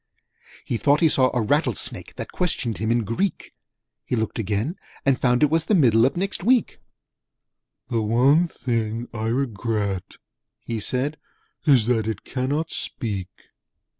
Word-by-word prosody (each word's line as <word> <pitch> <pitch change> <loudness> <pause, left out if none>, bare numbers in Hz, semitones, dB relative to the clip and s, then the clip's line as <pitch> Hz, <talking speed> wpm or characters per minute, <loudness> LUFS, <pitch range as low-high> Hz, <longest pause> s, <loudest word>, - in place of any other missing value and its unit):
He 120 - -1
thought 145 +6 +3
he 165 - +5
saw 130 -3 +3
a 120 -3 0
Rattlesnake 135 - 0
That - - -7
questioned 120 - -1
him 110 +1 -1
in 120 0 +2
Greek: 115 - -2 0.5
He - - -2
looked 110 0 -2
again, 110 - -1 0.3
and 135 -2 +2
found 125 +2 +3
it 150 - +4
was 160 0 +2
The 215 - +3
Middle 120 - +5
of 135 - -4
Next 195 0 -2
Week. 245 +3 +2 1.1
'The 115 -2 0
one 130 +10 +4
thing 115 -5 -2
I 110 -1 -3
regret,' 110 -6 -2 0.5
he 115 -1 -3
said, 130 +7 -1 0.5
'Is 130 -7 +5
that 115 -2 +1
it 110 -3 -3
cannot 145 +5 -2
speak!' 100 -5 -4
120 Hz, 150 wpm, -23 LUFS, 110-145 Hz, 1.1 s, he